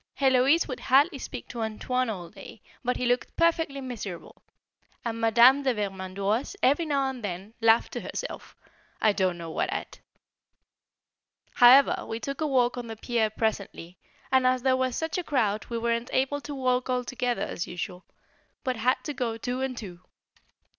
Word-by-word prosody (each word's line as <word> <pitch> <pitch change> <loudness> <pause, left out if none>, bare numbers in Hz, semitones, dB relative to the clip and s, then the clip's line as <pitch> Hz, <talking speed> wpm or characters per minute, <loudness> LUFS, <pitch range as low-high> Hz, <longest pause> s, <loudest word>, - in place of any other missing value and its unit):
Héloise 270 +4 +4
would 255 -4 -5
hardly 275 +4 +3
speak - - -7
to 235 - -5
"Antoine" 250 +3 -1
all 180 -6 -6
day, - - -12 0.2
and 250 0 0
he 250 - -2
looked 245 +1 0
perfectly 325 -4 +1
miserable, 215 -9 -7 0.6
and 230 -1 -3
Madame 235 +5 +6
de 260 -3 +1
Vermandoise 200 - -2
every 290 +5 +3
now 280 -2 +1
and 260 -3 -5
then 195 +2 -5
laughed 225 0 +4
to - - -4
herself - - -6 0.4
I 215 -1 +3
don't 185 -3 0
know 165 -1 -7
what - - -1
at. - - -5 1.5
However 255 +3 +6
we 225 - -4
took 275 +5 -5
a 310 - +1
walk 250 -3 +2
on 240 - -6
the 225 - -6
pier 225 -1 0
presently, 200 -5 -3 0.3
and 260 -1 +4
as 255 -1 +1
there 260 -1 +3
was 260 -1 0
such 320 +2 -2
a - - -3
crowd 220 -9 0
we 235 - -4
weren't 235 +1 -1
able 270 +2 0
to 290 0 -6
walk 255 -1 0
all 250 0 0
together 245 -3 -2
as 175 - -4
usual, 180 +1 -6 0.6
but 255 -2 -1
had 250 +3 +1
to 295 - -4
go 240 -4 -2
two 245 +3 -3
and 265 -2 -3
two. 180 -6 -8
245 Hz, 175 wpm, -27 LUFS, 220-265 Hz, 1.5 s, Madame